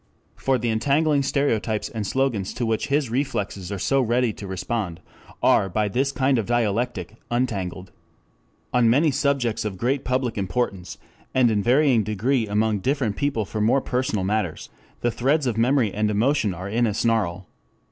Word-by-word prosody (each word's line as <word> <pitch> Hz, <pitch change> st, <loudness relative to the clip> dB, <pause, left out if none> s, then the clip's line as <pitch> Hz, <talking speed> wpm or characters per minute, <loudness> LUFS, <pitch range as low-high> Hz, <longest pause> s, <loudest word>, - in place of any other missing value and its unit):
For 135 Hz, -1 st, +1 dB
the 120 Hz, 0 st, -2 dB
entangling 140 Hz, +6 st, +2 dB
stereotypes 115 Hz, -6 st, 0 dB
and 110 Hz, -3 st, -4 dB
slogans 120 Hz, -7 st, -1 dB
to 120 Hz, -, -1 dB
which 110 Hz, -1 st, -1 dB
his 140 Hz, -4 st, 0 dB
reflexes 105 Hz, -7 st, -2 dB
are 100 Hz, -, -3 dB
so 135 Hz, +8 st, +1 dB
ready 120 Hz, -1 st, +1 dB
to 100 Hz, -, -8 dB
respond 95 Hz, -1 st, -3 dB, 0.4 s
are 95 Hz, -, +4 dB
by 105 Hz, +3 st, 0 dB
this 135 Hz, +6 st, 0 dB
kind 135 Hz, -2 st, +1 dB
of 110 Hz, -, -3 dB
dialectic 115 Hz, -3 st, -1 dB
untangled. 95 Hz, -7 st, -2 dB, 0.8 s
4 125 Hz, -, +2 dB
On 115 Hz, -2 st, +4 dB
many 145 Hz, +6 st, +4 dB
subjects 140 Hz, -5 st, 0 dB
of 105 Hz, -3 st, -4 dB
great 130 Hz, +6 st, 0 dB
public 125 Hz, -3 st, -1 dB
importance, 95 Hz, -3 st, -2 dB, 0.4 s
and 125 Hz, -3 st, +4 dB
in 105 Hz, -2 st, +1 dB
varying 125 Hz, +1 st, +4 dB
degree 110 Hz, +4 st, 0 dB
among 105 Hz, 0 st, +1 dB
different 125 Hz, -2 st, 0 dB
people 135 Hz, -6 st, -1 dB
for 105 Hz, +2 st, -4 dB
more 115 Hz, +6 st, +3 dB
personal 125 Hz, -7 st, -1 dB
matters, 100 Hz, -4 st, -2 dB, 0.3 s
the 120 Hz, -, +1 dB
threads 135 Hz, +6 st, +1 dB
of 120 Hz, -4 st, 0 dB
memory 120 Hz, -2 st, +2 dB
and 105 Hz, 0 st, 0 dB
emotion 110 Hz, -1 st, +1 dB
are 90 Hz, +3 st, -6 dB
in 115 Hz, +3 st, +1 dB
a 105 Hz, -, -2 dB
snarl. 100 Hz, -6 st, 0 dB
115 Hz, 170 wpm, -23 LUFS, 105-130 Hz, 0.8 s, are